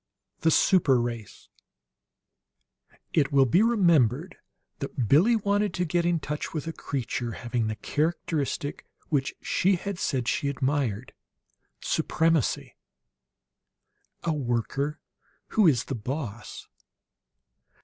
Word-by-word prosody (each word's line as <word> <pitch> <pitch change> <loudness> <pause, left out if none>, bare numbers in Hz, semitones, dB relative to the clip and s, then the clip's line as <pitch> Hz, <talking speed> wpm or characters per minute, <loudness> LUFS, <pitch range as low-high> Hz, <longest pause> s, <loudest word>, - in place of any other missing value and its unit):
V - - -18
THE - - +6
SUPER 155 -6 +4
RACE 120 -3 -5 1.7
It 145 -4 +2
will 135 -1 +5
be 170 - +3
remembered 170 - +3 0.4
that 135 -4 -3
Billie 180 - +5
wanted 205 -2 0
to 180 - 0
get 170 +1 +1
in 175 -1 +2
touch 150 +2 -5
with 155 - -3
a 165 - -4
creature 125 -5 -3
having 120 0 -2
the 110 - -2
characteristic 150 -1 -2 0.2
which 140 -3 0
she 190 +1 +2
had 195 +1 -5
said 130 -8 -1
she 140 +2 0
admired: 135 -4 -1 0.7
supremacy 160 -4 0 1.5
"A 165 - 0
worker 140 +2 -2 0.5
who 215 -4 +4
is 130 -7 +3
the - - -5
boss!" 120 -1 -6
145 Hz, 115 wpm, -27 LUFS, 125-170 Hz, 1.7 s, THE